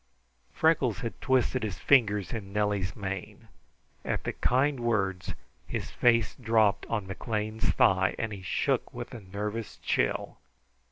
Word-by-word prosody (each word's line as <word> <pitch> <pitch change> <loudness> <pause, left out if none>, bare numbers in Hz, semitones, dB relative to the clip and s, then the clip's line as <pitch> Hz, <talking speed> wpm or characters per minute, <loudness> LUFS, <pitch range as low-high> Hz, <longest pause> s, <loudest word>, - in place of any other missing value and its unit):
Freckles 130 - +2
had 115 - -5
twisted 130 -1 +2
his 105 -4 -3
fingers 105 - +3
in 100 -4 -6
Nellie's 100 -3 0
mane. 95 -2 -6 0.5
At - - -2
the - - -2
kind 135 +2 +2
words 95 -6 -1 0.3
his - - -4
face 115 -2 +3
dropped 110 -4 +2
on 105 -4 -2
McLean's 110 +2 -2
thigh 95 0 +3
and 110 -2 -2
he 100 - -7
shook 95 - 0
with - - -6
a 120 - -6
nervous 105 +3 -5
chill. - - -1
105 Hz, 135 wpm, -29 LUFS, 100-120 Hz, 0.5 s, fingers